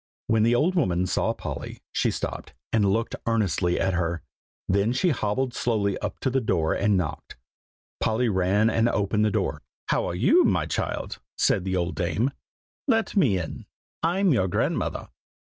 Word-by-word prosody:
When 110 -1 +2
the 115 +2 +4
old 160 +9 +2
woman 90 - +1
saw 90 - 0
Polly, - - -7
she - - +1
stopped, - - -5 0.2
and 105 -3 +3
looked 115 +3 -1
earnestly 100 -6 +1
at 95 -1 +1
her; 85 -1 -1 0.4
then 100 +5 +2
she 180 +8 +2
hobbled 120 +1 -1
slowly 105 -6 0
up 105 -2 -4
to 130 - 0
the 135 +1 +1
door 85 -8 +1
and 100 -1 +2
knocked. 85 -5 -4 0.6
Polly 115 +3 +1
ran 100 +1 +2
and 115 +1 +2
opened 105 0 +1
the - - +3
door. - - -1 0.3
"How - - +1
are - - -3
you, - - +5
my - - +2
child?" - - -3 0.2
said 95 - +2
the 95 -1 -1
old 90 -1 -1
dame; 100 +8 0 0.6
"let 225 -4 +1
me 135 - +4
in. 85 -3 -6 0.3
I'm 180 +2 +2
your 95 -7 +2
grandmother." 90 - -1
105 Hz, 170 wpm, -25 LUFS, 95-120 Hz, 0.6 s, you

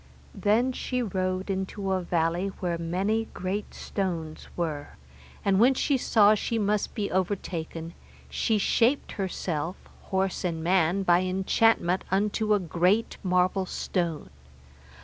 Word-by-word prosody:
Then 225 +5 +2
she 250 0 -2
rode 185 -1 -2
into 190 +1 -3
a 190 -1 +1
valley 170 +1 0
where 175 -2 -2
many 195 +7 0
great 190 +3 -3
stones 170 -5 -4
were, 155 -4 -3 0.5
and 195 -1 +3
when 255 +4 +5
she 280 - +1
saw 215 -4 +5
she 225 +2 -1
must 210 -1 0
be 205 -4 -2
overtaken, 170 -3 -3 0.3
she 220 -2 0
shaped 235 +6 +2
herself, 180 -4 -3 0.3
horse 190 0 -1
and 165 -3 -2
man, 180 +2 +2
by 175 -1 +4
enchantment 185 0 +2
unto 210 +2 +2
a - - +1
great 180 +5 +1
marble 185 +1 +2
stone. 170 - -2
190 Hz, 130 wpm, -27 LUFS, 175-210 Hz, 0.5 s, when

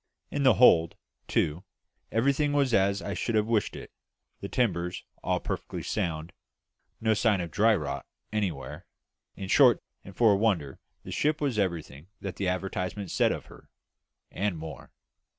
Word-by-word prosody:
In 145 - -1
the 130 -2 +5
hold, 85 -9 +6 0.3
too, 80 +5 0 0.5
everything 140 +5 +2
was 140 -4 +2
as 100 0 +2
I - - -3
should 115 - -2
have 105 -1 +3
wished 110 -3 0
it; - - -9 0.5
the 100 - -6
timbers 90 -8 -1 0.2
all - - +1
perfectly - - -5
sound; 80 0 -3 0.7
no 110 -1 +2
sign 105 -2 +2
of 85 -2 -4
dry 110 +4 +4
rot 75 -7 -4 0.3
anywhere; 85 -5 -3 0.5
in 95 - -6
short, 125 +3 +5 0.2
and 95 - -12
for 115 -4 +6
a - - +2
wonder, 90 -11 0 0.2
the - - -8
ship 150 +1 +1
was 135 -7 0
everything 85 -5 -3
that 95 -2 -6
the 100 - -1
advertisement 95 0 -3
said - - +3
of - - -4
her, - - -16 0.6
and 100 -3 -1
more. 80 -1 -9
100 Hz, 160 wpm, -28 LUFS, 85-115 Hz, 0.7 s, hold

